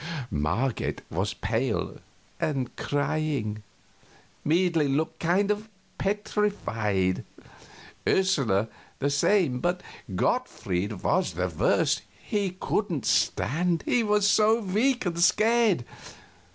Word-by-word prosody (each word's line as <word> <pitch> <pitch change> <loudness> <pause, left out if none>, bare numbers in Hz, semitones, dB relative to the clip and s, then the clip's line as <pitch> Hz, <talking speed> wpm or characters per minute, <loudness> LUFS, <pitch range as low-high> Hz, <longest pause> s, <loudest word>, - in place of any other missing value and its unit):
Marget 95 - -1
was 95 +5 -1
pale, 115 +1 -2 0.4
and 135 -5 -2
crying; 145 -7 -1 0.8
Meidling 160 -3 +2
looked 155 +2 -1
kind 190 +5 +2
of 210 +1 -3 0.3
petrified; 195 - 0 0.8
Ursula 135 - +2 0.3
the 140 +1 0
same; 140 -2 +2
but 175 +5 -1 0.3
Gottfried 90 +2 -1
was - - +1
the - - -1
worst - - +2 0.2
he 195 -3 -2
couldn't 175 - -1
stand, 165 - +1
he 245 - +2
was 210 -2 +2
so 215 +2 +4
weak 225 +5 +1
and 170 -1 -2
scared. 215 - +3
165 Hz, 100 wpm, -27 LUFS, -, 0.8 s, so